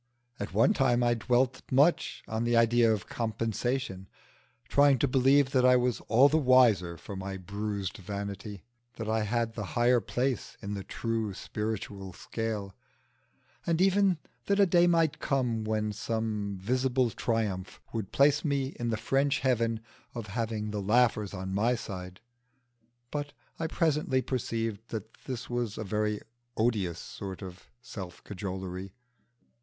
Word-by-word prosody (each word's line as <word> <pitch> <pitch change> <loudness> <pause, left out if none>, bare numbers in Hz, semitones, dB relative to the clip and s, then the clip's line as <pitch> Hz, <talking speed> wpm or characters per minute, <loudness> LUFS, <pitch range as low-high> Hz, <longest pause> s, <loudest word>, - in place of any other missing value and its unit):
At 100 - -4
one 115 - +4
time 125 - +2
I 120 0 +4
dwelt 125 +3 +1
much 145 +6 +3
on 110 +1 -2
the 120 0 +2
idea 115 0 +5
of 105 -4 -1
compensation; 115 -2 -2 0.6
trying 140 -1 +5
to 140 - +2
believe 135 +1 +4
that 130 -2 +3
I 125 0 +7
was 125 -4 +1
all 125 +5 +6
the 155 +2 +3
wiser 115 - +4
for 100 +5 -8
my 95 0 -5
bruised 100 +1 -4
vanity, 100 0 -6 0.3
that 110 -2 -5
I 110 0 +1
had 115 +1 0
the 110 - -4
higher 120 +1 +5
place 125 +5 -2
in 100 -1 -5
the 100 -1 -4
true 115 -3 -2
spiritual 100 -3 -4
scale, 110 -3 -4 0.9
and 165 -1 0
even 195 -1 +4 0.3
that 200 0 +2
a 200 - +7
day 175 -1 +4
might 165 -3 +2
come 125 -6 0
when 110 -1 0
some 105 -2 -2
visible 125 +4 +1
triumph 105 -6 -2
would 110 -4 -3
place 145 +1 +4
me 140 -3 -1
in 120 -1 -1
the 110 - 0
French 135 +5 +1
heaven 115 -4 +1 0.3
of 115 -3 -4
having 110 -2 -2
the 105 -1 -2
laughers 110 0 +2
on 95 -1 -5
my 115 +5 +2
side. 90 -4 -7 0.9
But 145 -1 -3 0.3
I 165 - 0
presently 150 -5 +1
perceived 115 -4 -2
that 110 0 -6
this 125 -2 -5
was 120 -3 -2
a - - -3
very 105 +1 -1 0.4
odious 105 -7 +1
sort 95 0 -7
of 90 -1 -10
self 95 -7 -8
cajolery. 95 -1 -5
115 Hz, 150 wpm, -29 LUFS, 100-130 Hz, 0.9 s, I